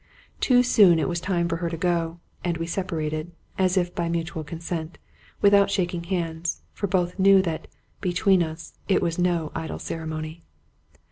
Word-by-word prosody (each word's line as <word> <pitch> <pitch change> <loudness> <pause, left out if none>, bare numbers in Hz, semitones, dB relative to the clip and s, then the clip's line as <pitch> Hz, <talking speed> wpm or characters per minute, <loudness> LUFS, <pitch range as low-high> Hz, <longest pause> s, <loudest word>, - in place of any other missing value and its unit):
Too 250 -2 +4
soon 205 -8 +6
it 160 - +1
was 175 -1 -2
time 175 -3 0
for 165 0 -1
her 170 0 -2
to 165 - -4
go; 170 -1 0 0.3
and 175 -2 -1
we 165 - -3
separated, 165 -2 -3 0.3
as 185 0 +2
if 175 -1 +1
by 170 -1 -1
mutual 165 -1 -2
consent, 165 +1 -5 0.4
without 200 0 +6
shaking 175 -3 -1
hands, 170 -2 -2
for 200 - -2
both 180 0 0
knew 195 0 +7
that, 165 -3 -3 0.3
between 185 0 +3
us, 160 0 -5
it 190 - +2
was 170 0 -1
no 175 -3 +1
idle 160 0 -4
ceremony. 160 0 -5
170 Hz, 165 wpm, -25 LUFS, 165-185 Hz, 0.4 s, knew